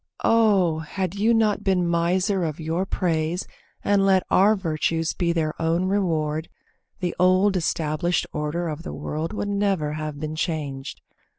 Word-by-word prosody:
Oh! 200 -8 +3
had 180 +3 -3
you 210 +3 +2
not 220 -3 +2
been 185 -3 +2
miser 180 +3 +1
of 155 -2 -3
your 165 +4 -2
praise 170 -1 -1 0.4
And 200 -1 +3
let 190 -1 +4
our 205 +3 +5
virtues 165 -3 -1
be 170 -2 0
their 160 -2 0
own 165 +3 +1
reward, 160 -5 0 0.5
The 175 -1 -2
old 185 +2 +4
established 165 0 0
order 150 +3 -2
of 155 0 -4
the 170 - -7
world 155 +2 -4
Would 205 -1 -3
never 195 -7 0
have 155 -1 -5
been 155 +1 -4
changed. 145 -5 -4
170 Hz, 155 wpm, -24 LUFS, 155-195 Hz, 0.5 s, our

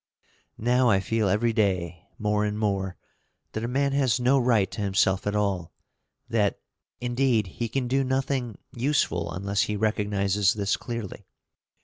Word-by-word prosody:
Now 125 +2 +3
I 100 -3 +4
feel 110 +1 0
every 115 +4 +2
day, 90 -6 -1
more 105 0 0
and 105 0 -1
more, 95 -3 -1 0.5
that 110 - -4
a - - -1
man 140 +3 +1
has 135 -3 +2
no 130 +3 +4
right 115 -6 +2
to - - -5
himself 95 -1 +1
at 105 - 0
all; 100 -5 -1 0.5
that, 110 -4 +1 0.4
indeed, 120 -3 +1
he 115 +6 -4
can 130 +2 -1
do 135 +2 +2
nothing 130 -3 -1 0.2
useful 120 - 0
unless 100 +3 -1
he 105 - 0
recognizes 100 -2 +1
this 100 -1 0
clearly. 115 -5 -6
105 Hz, 150 wpm, -26 LUFS, 100-125 Hz, 0.5 s, I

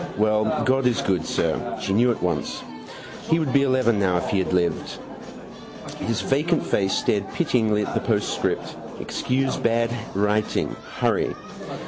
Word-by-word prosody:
Well, 110 0 +2
God 130 0 +3
is 120 - +1
good, 90 -4 0
sir. - - -1
She 95 - -1
knew 120 +5 +4
at 115 - -4
once. 90 -1 -2 0.7
He 160 - +4
would 155 -6 -1
be 140 - +5
eleven 130 -5 +2
now 90 -3 +2
if 85 - -2
he 100 - +1
had 95 - -1
lived. 90 -2 0 1.0
His 115 -1 -1
vacant 155 +5 +1
face 95 -1 +1
stared 100 -2 0
pityingly 110 -10 +1
at - - -5
the - - 0
postscript. - - -1 0.2
Excuse 135 +1 -1
bad 115 0 +1 0.2
writing. 105 +1 0 0.2
Hurry. - - +1
110 Hz, 150 wpm, -24 LUFS, 100-130 Hz, 1.0 s, be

